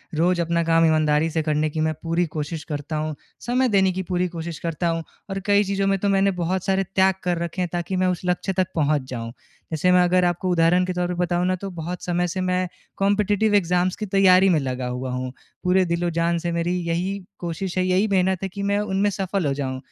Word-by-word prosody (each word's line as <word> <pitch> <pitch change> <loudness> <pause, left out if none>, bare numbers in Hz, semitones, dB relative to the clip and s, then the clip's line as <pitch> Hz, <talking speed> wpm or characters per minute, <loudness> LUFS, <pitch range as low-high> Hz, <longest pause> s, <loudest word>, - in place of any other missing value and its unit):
रोज़ 175 +2 +2
अपना 170 0 0
काम 165 0 +4
ईमानदारी 155 0 +2
से 160 0 -1
करने 155 0 +1
की 155 - -4
मैं 155 0 +1
पूरी 165 +1 +1
कोशिश 150 +1 -3
करता 145 0 -5
हूँ, 155 0 -2 0.2
समय 250 +1 +1
देने 195 -2 +3
की 190 +1 -3
पूरी 180 +1 -1
कोशिश 170 -2 -6
करता 170 +1 -2
हूँ। 165 0 -1 0.3
और 195 0 -3
कई 205 0 +4
चीज़ों 195 0 -1
में 195 - +2
तो 200 - 0
मैंने 195 0 +3
बहुत 180 +2 -1
सारे 195 0 +2
त्याग 190 0 +4
कर 175 -1 0
रखे 170 +2 -4
हैं 180 - -1
ताकि 175 +2 -2
मैं 185 0 +2
उस 180 -2 -1
लक्ष्य 180 +2 0
तक 185 -1 +1
पहुँच 150 -2 +2
जाऊँ। 115 -2 -5 0.4
जैसे 160 +3 +2
मैं 180 0 +6
अगर 180 0 +3
आपको 175 +2 0
उदाहरण 175 +1 +3
के 185 - -2
तौर 180 0 -1
पे 180 - -2
बताऊँ 175 0 +1
न 185 - +1
तो 195 - -4
बहुत 170 +2 -5
समय 175 0 0
से 185 +2 -3
मैं 185 0 0 0.3
कॉम्पिटिटिव 205 +1 +2
एग्जाम्स 180 -1 +2
की 215 - -4
तैयारी 195 -1 +5
में 165 -4 +3
लगा 130 -2 -3
हुआ 125 +1 -4
हूँ। 125 0 -3 0.3
पूरे 185 0 +3
दिल-ओ-जान 170 0 0
से 170 +1 -2
मेरी 170 +1 -1
यही 180 +4 -1 0.2
कोशिश 175 +2 -4
है 185 - +2
यही 185 +3 +2
मेहनत 190 -2 +1
है 195 - -2
कि 200 +2 -6
मैं 200 +1 +1
उनमें 205 0 +1
सफल 195 -2 -2
हो 140 - +1
जाऊँ। 135 -2 -3
180 Hz, 230 wpm, -23 LUFS, 165-190 Hz, 0.4 s, मैं